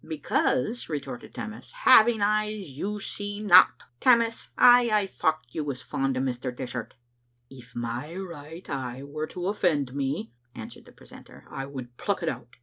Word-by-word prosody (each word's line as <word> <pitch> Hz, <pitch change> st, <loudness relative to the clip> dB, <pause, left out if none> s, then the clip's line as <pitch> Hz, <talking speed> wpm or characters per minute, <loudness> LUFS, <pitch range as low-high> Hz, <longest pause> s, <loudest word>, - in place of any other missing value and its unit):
"Because," 155 Hz, -, -1 dB
retorted 140 Hz, -5 st, -6 dB
Tammas, 220 Hz, 0 st, -7 dB
"having 220 Hz, -1 st, +6 dB
eyes 210 Hz, -4 st, 0 dB
you 200 Hz, +10 st, -4 dB
see 205 Hz, +1 st, -4 dB
not." 190 Hz, -4 st, +6 dB
" 120 Hz, 0 st, -45 dB
Tammas, 230 Hz, -2 st, +3 dB
I 245 Hz, -1 st, +7 dB
aye 210 Hz, -2 st, +2 dB
thocht 155 Hz, -8 st, -2 dB
you 155 Hz, -, -2 dB
was 140 Hz, -4 st, -5 dB
fond 135 Hz, -1 st, -1 dB
o' -, -, 0 dB
Mr. 130 Hz, -1 st, -2 dB
Dishart." 125 Hz, -1 st, -6 dB, 0.6 s
"If 125 Hz, -3 st, -14 dB
my 120 Hz, +7 st, -4 dB
right 170 Hz, -2 st, -8 dB
eye 130 Hz, -1 st, -4 dB
were 155 Hz, +2 st, -5 dB
to 180 Hz, -1 st, -6 dB
offend 155 Hz, -10 st, 0 dB
me," 140 Hz, +10 st, -3 dB, 0.2 s
answered -, -, -10 dB
the -, -, -15 dB
precentor, -, -, -15 dB
" -, -, -21 dB
I 135 Hz, 0 st, -5 dB
would 125 Hz, -3 st, -9 dB
pluck 200 Hz, -3 st, -2 dB
it 165 Hz, -, +1 dB
out. 120 Hz, 0 st, -8 dB
155 Hz, 170 wpm, -27 LUFS, 130-205 Hz, 0.6 s, I